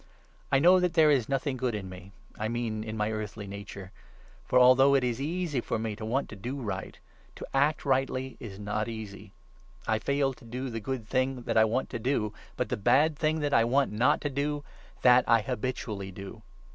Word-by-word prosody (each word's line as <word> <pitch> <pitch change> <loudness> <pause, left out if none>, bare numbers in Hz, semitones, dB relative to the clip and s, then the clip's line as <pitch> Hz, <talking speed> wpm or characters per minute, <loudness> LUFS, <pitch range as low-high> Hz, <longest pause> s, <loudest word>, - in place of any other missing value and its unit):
I 135 - +5
know 180 +6 +6
that 180 -2 0
there 155 -2 +6
is 130 -5 +2
nothing 135 0 -1
good 125 -3 -1
in 100 -2 -5
me 95 +1 -11 0.2
18 - - -28
— - - -19
I 105 - -1
mean 115 -2 -2
in 110 0 -5
my 105 0 0
earthly 105 -1 -5
nature. 100 -1 -8 0.6
For, - - +3
although 130 +2 +6
it 135 - +3
is 125 +1 -1
easy 160 -3 -1
for - - -2
me 110 -1 -3
to 110 - -9
want 125 +6 -1
to - - -8
do 125 +8 -5
right, 110 -6 -5 0.4
to - - -7
act 140 +3 +2
rightly 130 -1 0
is 100 -4 -8
not 105 +1 -2
easy. 105 -3 -8 0.5
I 110 -1 +1
fail 140 +2 0
to - - -19
do 125 +3 -5
the 115 - -3
19 - - -13
good 125 -1 -4
thing 130 +2 0
that - - -2
I 110 - +6
want 115 +4 -1
to 120 - -3
do, 110 -3 0 0.2
but - - -1
the - - -1
bad 150 +9 +3
thing 155 +1 0
that 145 -1 -1
I 115 - +5
want 135 +4 +2
not 115 +4 +2
to 145 - -1
do 145 +1 -2 0.2
— - - -25
that 125 0 +7
I 115 -1 +5
habitually 105 -4 -4
do. 100 +3 -9
120 Hz, 225 wpm, -29 LUFS, 110-135 Hz, 0.6 s, that